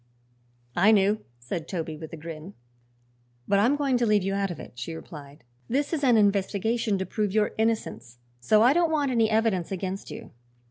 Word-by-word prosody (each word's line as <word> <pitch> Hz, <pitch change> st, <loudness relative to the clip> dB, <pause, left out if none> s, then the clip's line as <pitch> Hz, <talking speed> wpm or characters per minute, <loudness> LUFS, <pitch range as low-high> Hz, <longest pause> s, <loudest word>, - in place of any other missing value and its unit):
"I 195 Hz, +5 st, +5 dB
knew," 205 Hz, 0 st, +3 dB
said 140 Hz, +7 st, -5 dB
Toby, 165 Hz, -4 st, -4 dB
with 160 Hz, +1 st, -9 dB
a 165 Hz, -, -7 dB
grin. 160 Hz, +4 st, -9 dB, 0.9 s
"But 200 Hz, 0 st, +3 dB
I'm 240 Hz, +8 st, +3 dB
going 275 Hz, -3 st, +1 dB
to 240 Hz, -, +1 dB
leave 210 Hz, -2 st, +3 dB
you 195 Hz, +1 st, -1 dB
out 200 Hz, 0 st, 0 dB
of 175 Hz, -, -6 dB
it," -, -, -10 dB
she 165 Hz, -, -5 dB
replied. 145 Hz, -4 st, -11 dB, 0.2 s
"This 285 Hz, +5 st, -1 dB
is 300 Hz, -3 st, -1 dB
an 245 Hz, -4 st, +5 dB
investigation 205 Hz, +2 st, +1 dB
to 190 Hz, -, -2 dB
prove 210 Hz, +2 st, -2 dB
your 215 Hz, -1 st, +2 dB
innocence, 220 Hz, -, -2 dB, 0.2 s
so 215 Hz, -, +4 dB
I 250 Hz, +3 st, +6 dB
don't 340 Hz, 0 st, +2 dB
want 290 Hz, -4 st, +1 dB
any 225 Hz, -3 st, +2 dB
evidence 215 Hz, -6 st, +1 dB
against 190 Hz, +1 st, -4 dB
you." -, -, -9 dB
200 Hz, 190 wpm, -26 LUFS, 175-230 Hz, 0.9 s, I